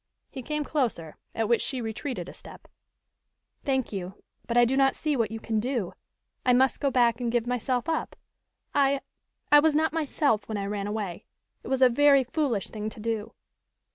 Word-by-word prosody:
He 265 - -6
came 300 +4 -2
closer, 235 - -2 0.2
at 225 -1 0
which 235 0 +3
she 260 - -2
retreated 240 +4 -4
a - - -9
step. - - -12 1.0
"Thank 265 -6 -1
you, 190 0 -6 0.2
but 235 - 0
I 240 - +7
do 255 +3 0
not 270 0 +3
see 305 -2 -1
what 230 -4 +1
you 225 +1 -5
can 220 -1 -1
do. 235 -5 -2 0.5
I 250 - +4
must 260 +1 +3
go 280 - +1
back 240 -2 +2
and 235 -1 -1
give 240 -1 +1
myself 245 0 -1
up. 320 -1 -2 0.6
I 280 -1 +3 0.5
I 295 - +9
was 305 0 +3
not 315 +1 +2
myself 285 -9 0
when 215 - -2
I 200 - -3
ran 200 0 -3
away. 205 -5 -4 0.3
It - - -11
was 265 0 +2
a - - +9
very 275 +2 +5
foolish 250 - -1
thing 215 0 -4
to 220 - -13
do." 220 -1 -3
245 Hz, 195 wpm, -27 LUFS, 220-275 Hz, 1.0 s, I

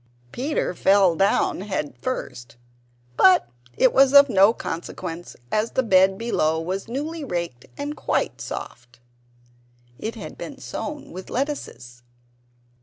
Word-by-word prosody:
Peter 270 - -2
fell 190 -1 +4
down 195 0 +1
head 190 -7 -3
first; 120 - -5 0.6
but 185 -10 +6 0.3
it 260 - +4
was 270 +1 +5
of 280 0 +9
no 200 -1 +6
consequence, 170 -3 -6 0.2
as 215 +2 0
the 260 - +1
bed 190 -3 +4
below 160 -9 0
was 185 +5 -4
newly 300 +6 -4
raked 170 - -4
and 290 +1 -4
quite - - -2
soft. 120 0 -8 1.0
It 220 - -4
had - - -9
been - - -7
sown 295 -1 -6
with 185 +2 -9
lettuces. 185 - -4
195 Hz, 125 wpm, -23 LUFS, 165-260 Hz, 1.0 s, of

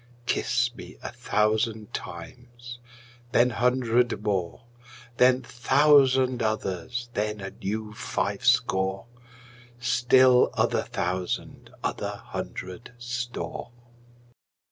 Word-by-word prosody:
Kiss 120 0 +1
me - - -11
a - - -5
thousand 110 -2 0
times, 120 +7 -8 0.5
then 125 +1 +4
hundred 120 -1 +1
more, 95 0 -2 0.5
Then 130 +1 +4
thousand 130 0 +4
others, 110 +2 -2
then 105 0 -2
a 95 -1 -6
new 110 +2 -4
five 100 -2 -3
score, 95 -6 +2 0.7
Still 125 +1 +5
other - - +2
thousand 90 0 -3
other - - -2
hundred 95 +6 -7
store. 120 0 -5
120 Hz, 90 wpm, -26 LUFS, 105-125 Hz, 0.7 s, Still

